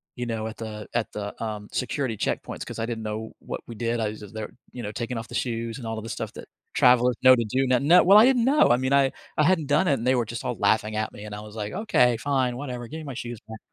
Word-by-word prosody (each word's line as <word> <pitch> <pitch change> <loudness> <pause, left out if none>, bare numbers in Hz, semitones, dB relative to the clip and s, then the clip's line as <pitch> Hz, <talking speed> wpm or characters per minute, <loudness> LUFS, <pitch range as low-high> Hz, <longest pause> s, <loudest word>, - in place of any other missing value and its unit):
you 120 - -4
know, 110 -1 -3
at 110 - -8
the 105 -2 -7
at 115 -2 -1
the, 105 +1 -6
um, 105 -1 -5
security 125 -3 -2
checkpoints - - -3
'cause - - -7
I 115 - 0
didn't 115 -2 -4
know 110 +1 -5
what - - -6
we 115 - -8
did, 115 +1 -1
I 105 - 0
was 105 - -8
just 105 0 -11
there, 110 -1 -5 0.2
you 120 - -6
know, 105 - -4
taking 120 +1 -4
off 115 - -5
the - - -7
shoes 115 -1 -2
and 120 -4 -7
all 110 0 -3
of 110 - -5
the 115 - -7
stuff - - -5
that - - -10 0.3
travelers 125 -1 +5
know 130 0 +9
to 120 - 0
do 130 +5 +1
no 125 -1 +3
no 170 +6 +6
well, 195 +3 +7
I 220 - +9
didn't 255 -3 +4
know, 290 +3 +5
I 120 - +5
mean, 130 +2 0
I 135 -1 +4 0.3
I 150 - +4
hadn't 165 -3 +2
done 180 +5 +3
it 140 - +4
and 120 -2 -2
they 130 - +4
were 120 -2 +1
just 120 +2 -6
all 120 - -1
laughing 110 +1 +1
at 110 0 -1
me 105 - -10
and 105 - -8
I 105 - -7
was 105 0 -11
like, 105 -1 -4
"Okay, 125 - +3
fine, 130 -2 0
whatever, 125 -4 -5
give 160 +5 -7
me - - -8
my 135 - -5
shoes 120 -3 -6
back." 110 -1 -9
120 Hz, 300 wpm, -25 LUFS, 110-130 Hz, 0.3 s, know